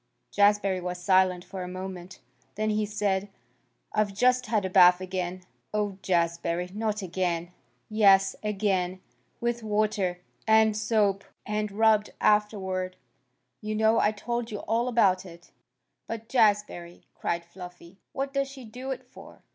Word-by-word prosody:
Jazbury 200 -2 +3
was 180 0 -4
silent 185 -1 +2
for 190 - -7
a 180 - -5
moment. 185 0 -8 0.3
Then 215 +1 0
he 210 0 0
said, 205 -1 -1 0.6
"I've 210 -2 0
just 250 +3 +3
had 215 -3 0
a - - -2
bath 180 0 +7
again." 185 -1 -4 0.3
"Oh, 205 -2 -1
Jazbury! 170 0 -1
Not 215 -1 -2
again?" 175 -1 -2 0.4
"Yes, 195 -3 +4
again. 195 -3 -1 0.4
With 240 0 -1
water. 210 -4 0 0.3
And 220 -1 +5
soap. 210 -2 +1 0.2
And 210 -1 -2
rubbed 215 0 +3
afterward. 190 -3 +1 0.7
You 215 0 -3
know. 220 +1 +3
I 210 - +3
told 235 +2 -4
you 210 -3 -5
all 235 +2 0
about 195 -6 +3
it." 170 -2 -14 0.6
"But, 225 0 -6
Jazbury!" 205 -7 +1
cried 170 0 -3
Fluffy. 180 +1 -12
"What 275 0 -3
does 275 0 0
she 270 -2 -11
do 250 +4 -8
it 260 -1 -4
for? 250 - -15
205 Hz, 140 wpm, -27 LUFS, 185-215 Hz, 0.7 s, bath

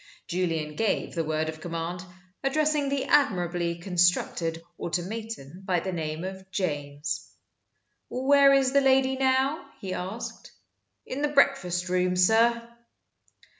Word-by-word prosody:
Julian 165 -4 -1
gave 220 +2 0
the 165 - -1
word 155 0 -1
of 155 0 -6
command, 170 +1 -4 0.4
addressing 295 +1 +1
the 275 -1 -1
admirably 175 -11 +2
constructed 175 -2 +1 0.2
automaton 180 -3 -4
by 185 -2 +1
the 190 - -4
name 160 -1 -3
of 190 0 -7
"James." 145 -5 -3 0.8
"Where 275 +2 +5
is 270 -1 +4
the 280 +1 +4
lady 265 0 +3
now?" 265 +5 +1 0.2
he 190 -2 -4
asked. 190 +6 -6 0.5
"In 270 - -5
the 295 - +2
breakfast 270 -11 +2
room, 180 0 +1
sir." 230 +5 +3
185 Hz, 125 wpm, -27 LUFS, 170-265 Hz, 0.8 s, Where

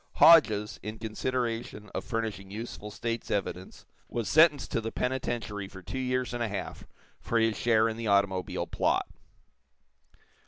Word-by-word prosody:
Hodges, 110 -11 +6
in 110 +2 -6
consideration 115 -1 -3
of - - -3
furnishing 110 -5 -3
useful 105 0 -7
state's 115 +2 -4
evidence, 95 -2 -3 0.2
was 115 -3 -3
sentenced 155 -3 +4
to 115 - 0
the 115 0 -4
penitentiary 120 -6 -2
for 95 -1 -12
two 130 - -5
years 125 -1 -1
and 120 - -3
a 115 - +1
half 100 - -6 0.3
for 115 - -1
his 115 -1 +2
share 115 -1 +3
in 110 0 -3
the 115 -1 -4
automobile 100 -2 +1
plot. - - 0
115 Hz, 150 wpm, -29 LUFS, 105-120 Hz, 0.3 s, Hodges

